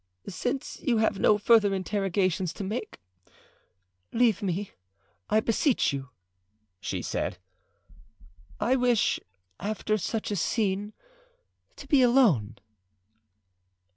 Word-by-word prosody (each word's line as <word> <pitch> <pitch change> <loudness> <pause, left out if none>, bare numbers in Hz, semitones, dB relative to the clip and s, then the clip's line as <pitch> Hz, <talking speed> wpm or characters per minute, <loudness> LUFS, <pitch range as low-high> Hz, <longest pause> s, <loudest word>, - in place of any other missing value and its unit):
"Since 250 +7 -3
you 240 -4 +1
have 220 -2 +1
no 210 - +4
further 210 -2 +4
interrogations 190 -2 -1
to - - -6
make, 215 +4 -5 1.1
leave 230 -4 +2
me, 195 0 -2 0.6
I 215 - +4
beseech 230 - +1
you," 135 -1 -5 0.7
she - - -4
said. - - -3 1.2
"I 260 - +2
wish, 245 -3 +2 0.4
after 215 +1 -1
such 215 +4 -3
a - - 0
scene, 205 +1 -1 0.8
to - - -11
be 280 -3 +4
alone." 220 - +4
210 Hz, 105 wpm, -27 LUFS, 190-235 Hz, 1.2 s, no